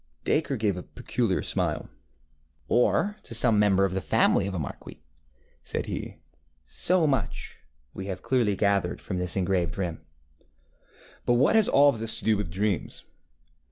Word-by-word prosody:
ŌĆØ - - -41
Dacre 145 -3 0
gave 105 -4 0
a - - -5
peculiar 110 +1 -2
smile. - - -2 0.8
ŌĆ£Or 205 - +2
to 115 - -7
some 115 -2 +3
member 100 -2 +4
of 95 - -2
the 95 - -2
family 95 - +2
of 95 - -4
a - - -2
marquis, 75 -5 -7
ŌĆØ - - -30 0.6
said - - -3
he. - - -6 0.5
ŌĆ£So 160 - +2
much 135 -8 -3 0.3
we 95 - -7
have 95 -2 -5
clearly 120 -6 +1
gathered 100 -3 0
from 90 -3 -4
this 90 -1 -1
engraved 90 -2 0
rim. 90 -4 -3 1.3
ŌĆØ 120 - +4
ŌĆ£But - - +3
what 140 - +3
has 220 -2 +5
all 145 +1 +6
this 115 -3 0
to - - -4
do 110 -1 +4
with 100 -4 -3
dreams? 100 +1 -2
100 Hz, 170 wpm, -26 LUFS, 90-120 Hz, 1.3 s, all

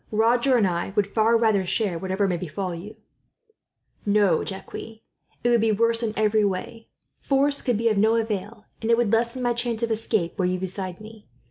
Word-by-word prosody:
Roger 235 +4 +3
and 220 - +3
I 175 +1 -2
would 205 - +3
far 220 +3 +2
rather 220 -4 +2
share 185 -2 0
whatever 190 +2 -1
may 180 - 0
befall 180 +2 -4
you." 180 +6 -9 1.1
"No, 200 -5 +2
Jacques, 190 -1 -7
it 225 0 -9 0.4
would 235 -2 +3
be 225 0 +2
worse 230 +2 +2
in 225 -2 -1
every 215 0 +2
way. 205 +4 -3 0.3
Force 280 +1 +2
could 245 -5 0
be 230 +2 0
of 215 -3 +2
no 220 +2 +4
avail, 215 -1 -3 0.2
and 225 - -2
it 230 - +5
would 235 -3 +1
lessen 235 +2 0
my 240 -1 +2
chance 235 -1 -3
of 230 - 0
escape, 220 -6 -1
were 185 - +2
you 180 0 0
beside 185 -1 -5
me. 215 0 -13
215 Hz, 200 wpm, -24 LUFS, 195-230 Hz, 1.1 s, it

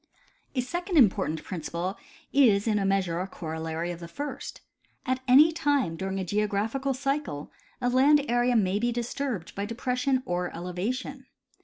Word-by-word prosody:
A 255 - +2
second 350 +7 -2
important 190 - +3
principle 175 +2 -4 0.4
is 220 -8 +5
in 215 -2 +2
a 195 - 0
measure 185 -4 +1
a 185 - -3
corollary 160 -1 -4
of 170 - -7
the 170 - -8
first: 285 +12 -6 0.4
At 255 0 0
any 290 +6 +7
time 285 - +1
during 190 +3 -3
a 190 - -2
geographical 210 +7 0
cycle 275 - -2 0.3
a 245 - 0
land 275 +3 +5
area 245 +1 +2
ma}^ 200 -1 +2
be 240 0 +1
disturbed 240 - -3
b}^ 200 +1 -3
depression 250 +3 0
or 180 -2 -2
elevation. 220 +10 -4
220 Hz, 155 wpm, -27 LUFS, 180-265 Hz, 0.4 s, any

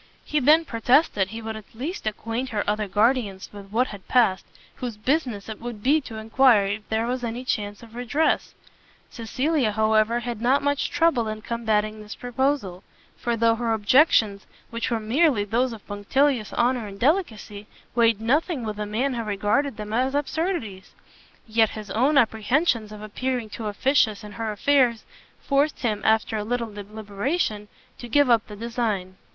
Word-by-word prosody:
He 300 - 0
then 305 +4 +5
protested 230 - +2
he 225 +3 -8
would 220 0 -4
at 220 0 -12
least 280 - -5
acquaint 230 +4 -3
her 215 -4 -1
other 210 0 0
guardians 210 -1 +1
with 200 -1 -10
what 240 +5 +1
had 200 -2 -10
passed, 220 -7 +2 0.3
whose 240 -4 -5
business 245 -4 -1
it 220 -1 -7
would 235 -3 -7
be 300 +4 +4
to 235 -4 -9
enquire 220 -1 +4
if 205 +2 -4
there 220 +1 0
was 250 +1 -2
any 240 +2 -4
chance 205 -2 -3
of 225 -1 -14
redress. 250 +6 0 0.6
Cecilia, 255 +2 0
however, 220 +2 +2
had 235 -2 -5
not 260 +4 +2
much 285 0 0
trouble 325 -9 +2
in 215 0 -5
combating 215 -2 -1
this 210 0 -9
proposal; 245 -7 -2 0.3
for 235 -1 -2
though 230 0 +4
her 230 0 -1
objections, 220 -3 +3 0.2
which 230 0 -2
were 230 - 0
merely 240 +1 +2
those 235 +5 0
of 225 -3 -10
punctilious 225 +4 0
honour 240 -2 +1
and 200 0 -10
delicacy, 225 - -1 0.3
weighed 230 -3 +3
nothing 280 +5 0
with 210 -1 -5
a 210 - -3
man 250 +6 -1
who 235 - -2
regarded 215 +6 0
them 210 0 -6
as 260 +4 +1
absurdities, 290 - -3 0.5
yet 220 0 +3
his 210 -2 -8
own 265 +8 +2
apprehensions 230 0 +2
of 210 0 -9
appearing 240 +1 -3
too 220 0 -5
officious 220 -1 +1
in 210 - -9
her 225 +1 -3
affairs, 240 0 +2 0.4
forced 285 +2 +1
him, 215 -4 -1
after 220 0 +2
a 210 - -2
little 230 -1 -3
deliberation, 210 - -3 0.3
to 240 - -8
give 285 +1 +4
up 230 -2 +3
the 210 - -9
design. 215 -4 -3
230 Hz, 170 wpm, -24 LUFS, 210-255 Hz, 0.6 s, then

